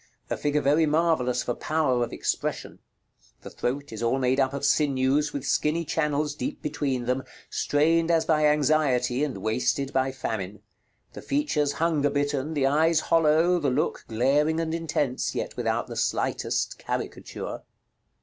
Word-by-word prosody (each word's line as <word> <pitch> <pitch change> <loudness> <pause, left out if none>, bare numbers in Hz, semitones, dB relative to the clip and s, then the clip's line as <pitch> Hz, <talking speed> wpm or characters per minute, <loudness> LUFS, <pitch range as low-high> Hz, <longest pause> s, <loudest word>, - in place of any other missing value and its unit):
A - - +1
figure 145 0 0
very 150 +3 +3
marvellous 150 -6 +1
for 120 - -1
power 135 -4 0
of 120 - -4
expression. - - -3 0.6
The - - -9
throat 140 +3 -3
is 110 - -6
all 120 +3 +1
made 130 0 +1
up 130 -1 +2
of 140 0 -3
sinews 145 0 +2
with 140 -2 -5
skinny 160 +4 +1
channels 150 -2 0
deep 150 - -4
between 140 -4 -2
them, 130 +2 0 0.3
strained 165 +3 +2
as 165 -1 +3
by 155 -2 +3
anxiety, 145 -4 +2
and 145 -4 -2
wasted 125 +5 0
by 130 0 +1
famine; 105 -6 -5 0.5
the - - -8
features 165 - 0
hunger 150 -1 +1
bitten, 145 +1 -1
the 140 -2 +2
eyes 160 +4 +3
hollow, 165 +2 +3
the 145 -4 +1
look 130 +4 -1
glaring 145 +8 +2
and 165 -1 -2
intense, 150 -6 -1
yet - - -3
without - - -1
the - - -8
slightest: - - -1
caricature. - - -5
145 Hz, 155 wpm, -26 LUFS, 130-155 Hz, 0.6 s, very